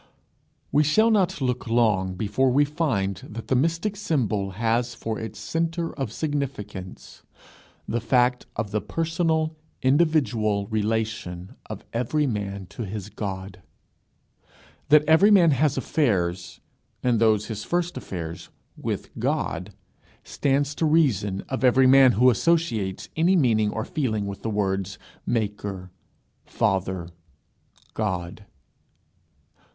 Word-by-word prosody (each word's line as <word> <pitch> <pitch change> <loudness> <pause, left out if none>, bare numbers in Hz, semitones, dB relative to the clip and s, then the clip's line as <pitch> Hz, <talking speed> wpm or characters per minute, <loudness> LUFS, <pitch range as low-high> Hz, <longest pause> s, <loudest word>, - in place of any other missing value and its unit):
We 150 - +4
shall 220 +10 +4
not 190 -6 +1
look 125 -1 -1
long 105 -6 +2
before 110 +7 +1
we 140 +4 +4
find 135 - -1
that 115 +1 -9
the 130 - +3
mystic 165 +9 0
symbol 110 - -1
has 115 +2 0
for 110 -1 -4
its 110 -3 -7
centre 165 0 -2
of 135 -7 -4
significance 115 - -5 0.7
the 120 +2 -1
fact 125 +1 +2
of 105 -1 -3
the 105 0 0
personal 160 -1 0 0.3
individual 130 -8 +2
relation 110 -4 -2
of - - -8
every 125 +6 0
man 100 -5 -3
to - - -8
his 105 0 -6
God. 95 -3 -6 1.3
That 150 +1 +6
every 160 +7 +6
man 180 -6 +6
has 140 +1 +2
affairs, 90 - -1 0.4
and 120 -3 +2
those 110 -2 +3
his 110 -2 -5
first 175 0 -1
affairs, 85 -3 -6 0.3
with - - -4
God, - - -2 0.5
stands 140 +1 0
to 160 - 0
the - - +2
reason 105 - +2
of 130 0 -3
every 130 +1 +5
man 130 -1 +7
who 125 +4 +5
associates 115 - 0
any 170 +4 +3
meaning 115 - +3
or 110 +2 -3
feeling 110 -10 -1
with 100 -1 -6
the 115 - -3
words, 95 -2 -1 0.3
Maker, 100 -4 -3 0.5
Father, 95 -2 -1 0.8
God. 95 -2 -3
115 Hz, 125 wpm, -25 LUFS, 100-150 Hz, 1.3 s, man